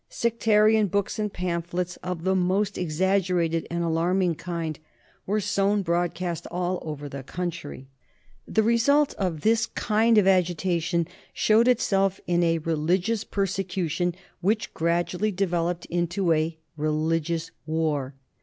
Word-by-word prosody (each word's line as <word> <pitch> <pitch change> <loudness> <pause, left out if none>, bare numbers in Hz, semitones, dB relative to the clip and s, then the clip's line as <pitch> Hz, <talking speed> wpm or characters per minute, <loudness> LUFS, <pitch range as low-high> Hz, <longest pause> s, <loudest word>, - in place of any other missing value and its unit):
Sectarian 220 -2 +3
books 200 +3 -1
and 210 -1 -1
pamphlets 175 0 -3
of 180 -2 -5
the 190 +1 +2
most 190 +2 +1
exaggerated 180 -1 0
and 170 0 -1
alarming 170 +2 +1
kind 165 -1 -4 0.5
were 210 +3 +1
sown 200 0 +1
broadcast 175 0 -1
all 180 +1 -1
over 150 -2 -6
the 140 -1 -6
country. 150 -2 -5 0.6
The 220 - +2
result 255 +6 +3
of 175 -6 -1
this 220 +2 +2
kind 225 +1 +2
of 205 - +5
agitation 175 -2 +1 0.3
showed 220 +3 +4
itself 195 -6 +2
in 175 0 +1
a 165 -1 +2
religious 175 +7 0
persecution, 180 -3 -1 0.2
which 210 +2 0
gradually 175 +5 0
developed 175 -2 -1
into 175 +1 0
a 160 +1 -1 0.2
religious 160 +2 -1 0.2
war. 150 -4 -1
180 Hz, 125 wpm, -25 LUFS, 165-200 Hz, 0.6 s, of